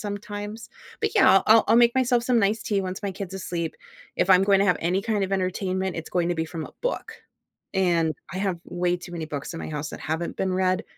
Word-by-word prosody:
sometimes, 205 +2 -6 0.3
but - - -1
yeah, 405 - +6
I'll 195 - +5
I'll 220 +1 +7
I'll 225 - +5
make 235 0 +5
myself 245 -2 +2
some 250 -2 +3
nice 210 +2 +1
tea 200 -2 0
once 185 +2 -5
my 200 -1 -2
kid's 195 0 -6
asleep. 175 -3 -4 0.4
If 190 - +1
I'm 185 0 +7
going 195 -1 +4
to - - +4
have 180 - +3
any 185 +4 0
kind 215 -3 0
of 190 - -5
entertainment, 185 -1 -1
it's 165 - -5
going 175 -1 +1
to - - +1
be 160 - 0
from 165 -2 -6
a - - -15
book, 485 -2 -2 0.6
and, 170 -4 +2 0.2
I - - -3
have 190 -4 -1
way 175 0 -1
too 175 0 -10
many 165 -2 -4
books 150 +1 -5
at 165 - -6
my - - -6
house 150 -1 -4
that - - -7
haven't 160 +2 -3
been 190 -1 0
read. 185 0 +1
190 Hz, 245 wpm, -25 LUFS, 175-205 Hz, 0.6 s, I'll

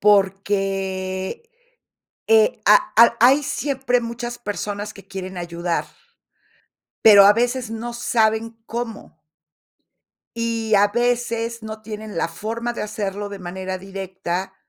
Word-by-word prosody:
porque, 195 - 0 0.8
eh, 450 +2 +4
a - - +7 0.2
al 235 0 +7
hay 265 +5 +6
siempre 265 -3 0
muchas 240 +1 -5
personas 205 -1 -4
que 195 -1 -15
quieren 190 -1 -7
ayudar, 170 0 -2 1.2
pero 200 -2 +9
a 205 - +8
veces 240 +1 -1
no 235 +1 -5
saben 225 -1 0
cómo 230 -8 -6 1.2
y 230 -1 -1
a 205 0 +5
veces 235 0 -1
no 215 0 -7
tienen 215 -2 -7
la 165 - 0
forma 225 +7 -4
de - - -5
hacerlo 205 -1 -4
de 200 -1 -8
manera 185 +1 -5
directa 190 -1 -5
215 Hz, 120 wpm, -22 LUFS, 195-235 Hz, 1.2 s, pero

